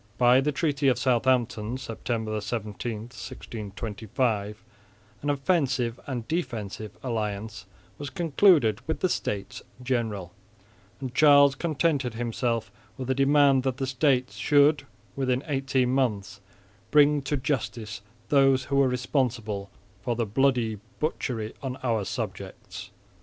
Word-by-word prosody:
By 125 Hz, +1 st, +5 dB
the 150 Hz, +2 st, +1 dB
treaty 145 Hz, -1 st, 0 dB
of 130 Hz, -, +4 dB
Southampton, 120 Hz, -2 st, +1 dB
September 110 Hz, -3 st, -3 dB
17, 110 Hz, +1 st, -4 dB
1625, 110 Hz, -2 st, -4 dB, 0.6 s
an 145 Hz, -, -2 dB
offensive 135 Hz, -5 st, +1 dB
and 120 Hz, -5 st, -4 dB
defensive 110 Hz, -, -4 dB
alliance 105 Hz, -4 st, -3 dB, 0.3 s
was 145 Hz, -1 st, -5 dB
concluded 155 Hz, -, +3 dB
with 160 Hz, -, -2 dB
the 185 Hz, -, +2 dB
States 105 Hz, -, -3 dB, 0.2 s
General; 110 Hz, -8 st, -2 dB, 0.7 s
and 130 Hz, -3 st, -5 dB
Charles 140 Hz, -1 st, +6 dB
contented 145 Hz, -5 st, 0 dB
himself 115 Hz, -1 st, -2 dB, 0.3 s
with 130 Hz, 0 st, -3 dB
a -, -, +4 dB
demand 140 Hz, 0 st, +4 dB
that 130 Hz, -1 st, -2 dB
the 135 Hz, -, -1 dB
States 130 Hz, -1 st, +1 dB
should 145 Hz, -1 st, +4 dB, 0.3 s
within 130 Hz, -1 st, 0 dB
eighteen 135 Hz, -3 st, 0 dB
months 110 Hz, -8 st, -1 dB, 0.5 s
bring 150 Hz, -1 st, +5 dB
to 140 Hz, +2 st, -1 dB
justice 115 Hz, -6 st, -3 dB, 0.3 s
those 135 Hz, -2 st, +4 dB
who 140 Hz, +1 st, -1 dB
were 140 Hz, -1 st, +5 dB
responsible 120 Hz, -6 st, -1 dB, 0.3 s
"for 120 Hz, +2 st, -1 dB
the 115 Hz, 0 st, 0 dB
bloody 115 Hz, -1 st, +1 dB, 0.2 s
butchery 120 Hz, -8 st, -2 dB
on 130 Hz, -2 st, -4 dB
our 115 Hz, -5 st, 0 dB
subjects." 105 Hz, -, -6 dB
125 Hz, 120 wpm, -26 LUFS, 110-140 Hz, 0.7 s, Charles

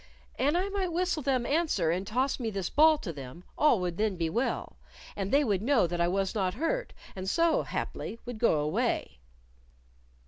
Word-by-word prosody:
An 290 Hz, +5 st, +2 dB
I 365 Hz, +3 st, +1 dB
might 390 Hz, -3 st, -2 dB
whistle 350 Hz, -1 st, 0 dB
them 260 Hz, -3 st, 0 dB
answer 285 Hz, -, +1 dB
and 185 Hz, +3 st, -2 dB
toss 255 Hz, +6 st, 0 dB
me 230 Hz, -3 st, -2 dB
this 195 Hz, -4 st, -3 dB
ball 310 Hz, +1 st, +6 dB
to 195 Hz, -, -6 dB
them, 140 Hz, +4 st, -9 dB
all 295 Hz, -8 st, +4 dB
would 175 Hz, -1 st, -2 dB
then 215 Hz, -2 st, 0 dB
be 165 Hz, -2 st, -1 dB
well, 240 Hz, +7 st, -2 dB, 0.4 s
and 195 Hz, -1 st, -3 dB
they 285 Hz, +2 st, +4 dB
would 205 Hz, -7 st, 0 dB
know 250 Hz, -2 st, +3 dB
that 175 Hz, 0 st, -2 dB
I 170 Hz, -, +3 dB
was 190 Hz, +1 st, 0 dB
not 190 Hz, -4 st, -1 dB
hurt, -, -, -1 dB, 0.2 s
and 190 Hz, 0 st, -3 dB
so, 335 Hz, +7 st, +3 dB
haply, 230 Hz, -, -4 dB
would 245 Hz, -3 st, -6 dB
go 215 Hz, -10 st, +3 dB
away." 150 Hz, -, -1 dB
225 Hz, 195 wpm, -29 LUFS, 180-300 Hz, 0.4 s, ball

